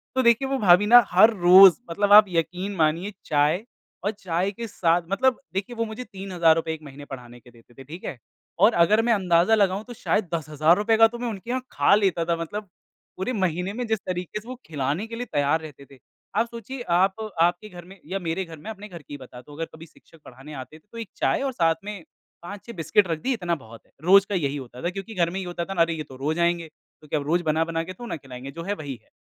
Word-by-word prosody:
तो 260 Hz, -, +3 dB
देखिए, 235 Hz, +3 st, +4 dB
वो 270 Hz, 0 st, -1 dB
भाभी 185 Hz, 0 st, +5 dB
ना 240 Hz, +2 st, +8 dB
हर 215 Hz, +6 st, +7 dB
रोज़ 185 Hz, +3 st, +8 dB
मतलब 205 Hz, +4 st, +2 dB
आप 210 Hz, 0 st, +10 dB
यकीन 180 Hz, +4 st, -2 dB
मानिए, 165 Hz, +5 st, 0 dB
चाय 150 Hz, +6 st, +1 dB, 0.4 s
और 205 Hz, -, +1 dB
चाय 190 Hz, -2 st, -2 dB
के 230 Hz, +3 st, -7 dB
साथ 175 Hz, -3 st, +1 dB
मतलब 250 Hz, +5 st, +1 dB
देखिए 195 Hz, +5 st, -4 dB
वो 230 Hz, 0 st, -1 dB
मुझे 220 Hz, +3 st, -7 dB
3000 190 Hz, -6 st, +1 dB
रूपये 160 Hz, 0 st, -2 dB
1 155 Hz, -, -9 dB
महीने 145 Hz, 0 st, -11 dB
पढ़ाने 125 Hz, -3 st, -10 dB
के 120 Hz, 0 st, -19 dB
देते 115 Hz, 0 st, -21 dB
थे, 135 Hz, -, -12 dB
ठीक 160 Hz, +7 st, -10 dB
है? 130 Hz, -, -5 dB, 0.4 s
और 210 Hz, +4 st, +6 dB
अगर 190 Hz, +6 st, +4 dB
मैं 235 Hz, 0 st, +2 dB
अंदाजा 180 Hz, +1 st, +3 dB
लगाऊँ 200 Hz, -1 st, +1 dB
तो 245 Hz, -, -9 dB
शायद 210 Hz, -5 st, -1 dB
10,000 155 Hz, +1 st, +2 dB
रूपये 220 Hz, +2 st, +2 dB
का 225 Hz, 0 st, +7 dB
तो 240 Hz, +1 st, -9 dB
मैं 245 Hz, -, -3 dB
उनके 215 Hz, +2 st, -8 dB
यहाँ 255 Hz, +1 st, -1 dB
खा -, -, +3 dB
लेता 190 Hz, -5 st, +1 dB
था 170 Hz, 0 st, +1 dB
मतलब, 200 Hz, +5 st, -6 dB, 0.5 s
पूरे 190 Hz, +7 st, -2 dB
महीने 185 Hz, -1 st, -1 dB
में 245 Hz, +2 st, -3 dB
जिस 220 Hz, -1 st, 0 dB
तरीके 180 Hz, +2 st, -4 dB
से 220 Hz, -, -18 dB
वो 255 Hz, -, -5 dB
खिलाने 150 Hz, +6 st, -2 dB
के 230 Hz, -, -7 dB
लिए 245 Hz, -, -4 dB
तैयार 145 Hz, +3 st, +1 dB
रहते 145 Hz, -3 st, -11 dB
थे। 135 Hz, -, -16 dB, 0.4 s
आप 230 Hz, -, +2 dB
सोचिए 240 Hz, +3 st, -8 dB
आप 185 Hz, +3 st, +3 dB, 0.3 s
आपके 175 Hz, +5 st, +1 dB
घर 175 Hz, -3 st, -11 dB
में 190 Hz, +2 st, -15 dB
या 195 Hz, +3 st, -3 dB
मेरे 175 Hz, +1 st, -2 dB
घर 165 Hz, -1 st, -11 dB
में, 180 Hz, +9 st, -10 dB
अपने 210 Hz, 0 st, -10 dB
घर 170 Hz, -4 st, -10 dB
की 145 Hz, -, -13 dB
ही -, -, -5 dB
बताता 130 Hz, +1 st, -13 dB
हूँ। 145 Hz, -, -12 dB
अगर 165 Hz, -, -1 dB
कभी 160 Hz, -, -11 dB
शिक्षक 165 Hz, 0 st, -22 dB
पढ़ाने 135 Hz, +4 st, -12 dB
आते 130 Hz, +2 st, -9 dB
थे, -, -, -37 dB
तो 230 Hz, -, -11 dB
एक 225 Hz, -5 st, -6 dB
चाय -, -, +1 dB
और 270 Hz, -, -1 dB
साथ 165 Hz, -7 st, +2 dB
में 205 Hz, -4 st, -7 dB, 0.4 s
5-6 205 Hz, +6 st, -9 dB
बिस्कुट 170 Hz, +5 st, +2 dB
रख 165 Hz, -2 st, -2 dB
दी 265 Hz, -, 0 dB
इतना 175 Hz, -7 st, -1 dB
बहुत 115 Hz, -6 st, -14 dB
है, -, -, -31 dB
रोज़ 190 Hz, +3 st, +6 dB
का 200 Hz, -, -1 dB
यही 145 Hz, -5 st, -1 dB
होता 125 Hz, -2 st, -10 dB
था 175 Hz, -, 0 dB
क्योंकि 195 Hz, +4 st, -7 dB
घर 170 Hz, -2 st, +2 dB
में 190 Hz, -, -4 dB
ये 190 Hz, -, -5 dB
होता 175 Hz, -1 st, -4 dB
था 195 Hz, -, -5 dB
ना, 175 Hz, -, +1 dB
अरे 165 Hz, 0 st, +2 dB
ये 155 Hz, -, -5 dB
तो 130 Hz, -, -14 dB
रोज़ 155 Hz, +5 st, -2 dB
आएँगे, 170 Hz, -1 st, +1 dB
क्योंकि 155 Hz, -1 st, -10 dB
अब 145 Hz, -, -1 dB
रोज 175 Hz, +3 st, +2 dB
बना-बना 165 Hz, +1 st, -1 dB
के 185 Hz, +2 st, -8 dB
तो 240 Hz, -, -10 dB
ना 235 Hz, -, -4 dB
खिलाएँगे 135 Hz, -1 st, -10 dB
जो 165 Hz, +2 st, -8 dB
है 200 Hz, +4 st, -2 dB
वही 145 Hz, -8 st, -6 dB
है। -, -, -33 dB
175 Hz, 255 wpm, -24 LUFS, 160-210 Hz, 0.5 s, आप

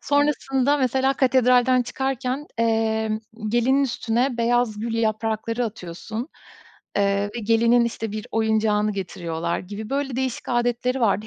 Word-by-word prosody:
Sonrasında 285 Hz, -1 st, +1 dB
mesela 265 Hz, 0 st, +2 dB
katedralden 255 Hz, -1 st, +4 dB
çıkarken, 265 Hz, +2 st, -3 dB
emm, 220 Hz, -1 st, +1 dB, 0.3 s
gelinin 245 Hz, +5 st, +3 dB
üstüne 245 Hz, 0 st, 0 dB
beyaz 235 Hz, -2 st, +1 dB
gül 230 Hz, +1 st, -3 dB
yaprakları 225 Hz, +1 st, -1 dB
atıyorsun, 215 Hz, -, -6 dB, 0.7 s
eee, 200 Hz, 0 st, +1 dB
ve -, -, -3 dB
gelinin, 230 Hz, +2 st, +3 dB
işte, 225 Hz, -2 st, -4 dB
bir 215 Hz, +1 st, -5 dB
oyuncağını 215 Hz, -1 st, +1 dB
getiriyorlar 170 Hz, -4 st, -3 dB
gibi 210 Hz, +3 st, -8 dB
böyle 275 Hz, -2 st, -2 dB
değişik 260 Hz, -2 st, -3 dB
âdetleri 245 Hz, +1 st, 0 dB
vardı. 215 Hz, -2 st, +1 dB
230 Hz, 125 wpm, -23 LUFS, 215-255 Hz, 0.7 s, katedralden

